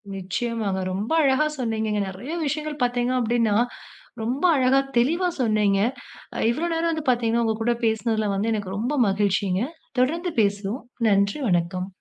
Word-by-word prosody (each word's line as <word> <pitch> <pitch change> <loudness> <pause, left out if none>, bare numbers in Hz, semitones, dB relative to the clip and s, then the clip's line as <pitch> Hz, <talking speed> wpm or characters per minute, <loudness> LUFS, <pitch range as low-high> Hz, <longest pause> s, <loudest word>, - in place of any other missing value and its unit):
நிச்சயமாங்க. 195 +1 -2
ரொம்ப 205 +9 -3
அழகா 275 +2 +3
சொன்னீங்க. 220 -2 -1 0.2
நிறைய 195 - -7
விஷயங்கள் 300 -1 -3
பாத்தீங்க 245 0 +1
அப்பிடீன்னா, 230 -2 +1 0.7
ரொம்ப 250 +7 -2
அழகா, 265 0 +4 0.2
தெளிவா 330 +10 +2
சொன்னீங்க. 215 -4 +2 0.7
இவ்வளவு 335 +7 -2
நேரம் 330 +1 +1
வந்து 315 -3 -4
பாத்தீங்கன்னா 235 -1 +2
உங்க 220 - +1
கூடப் 235 +1 0
பேசுனதுல 220 -2 0
வந்து 215 +3 0
எனக்கு 200 -3 -3
ரொம்ப 240 +7 -1 0.2
மகிழ்ச்சிங்க. 195 -1 +1 0.4
தொடர்ந்து 335 +7 +1
பேசுவோம். 200 +4 -1 0.3
நன்றி. 200 +5 +2
வணக்கம். 180 +1 0
230 Hz, 135 wpm, -24 LUFS, 200-260 Hz, 0.7 s, அழகா